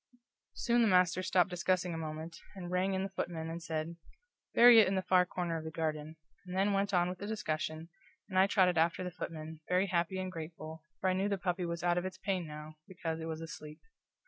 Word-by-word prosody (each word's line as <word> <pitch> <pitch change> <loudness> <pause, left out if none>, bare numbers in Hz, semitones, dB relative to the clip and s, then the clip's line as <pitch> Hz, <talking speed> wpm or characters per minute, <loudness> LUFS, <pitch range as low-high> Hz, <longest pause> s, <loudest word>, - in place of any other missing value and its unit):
Soon 240 0 +2
the 230 - +5
master 180 -2 +4
stopped 185 0 +2
discussing 180 0 0
a - - -3
moment, 160 +1 -6 0.2
and 180 -2 -6
rang 185 +1 +1
in 190 - 0
the 195 - -3
footman, 165 -4 -3
and 170 +1 -5
said, 165 0 -3 0.6
"Bury 240 -1 +9
it 215 - +6
in 190 - 0
the 190 - 0
far 180 -1 +4
corner 175 -2 -2
of - - -8
the 160 - -4
garden," 155 -1 -3 0.3
and 180 +1 -4
then 200 +1 +3
went 200 0 +1
on 175 -2 +3
with 180 0 -5
the 205 - -5
discussion, 160 -6 -3 0.4
and 185 -2 +1
I 190 - +6
trotted 180 -4 +3
after 165 +2 +2
the 180 - -4
footman, 160 -2 -6
very 180 +2 +3
happy 180 0 0
and 185 0 -3
grateful, 160 -1 -8 0.2
for 190 - 0
I - - +1
knew 195 +2 0
the 200 - 0
puppy 180 -1 -1
was 170 0 -4
out 175 0 +3
of 175 - -5
its 185 0 -5
pain 185 -3 -2
now, 150 +1 -9
because 165 -3 -4
it 160 - -5
was 160 0 -4
asleep. 155 -1 -8
175 Hz, 230 wpm, -33 LUFS, 160-185 Hz, 0.6 s, Bury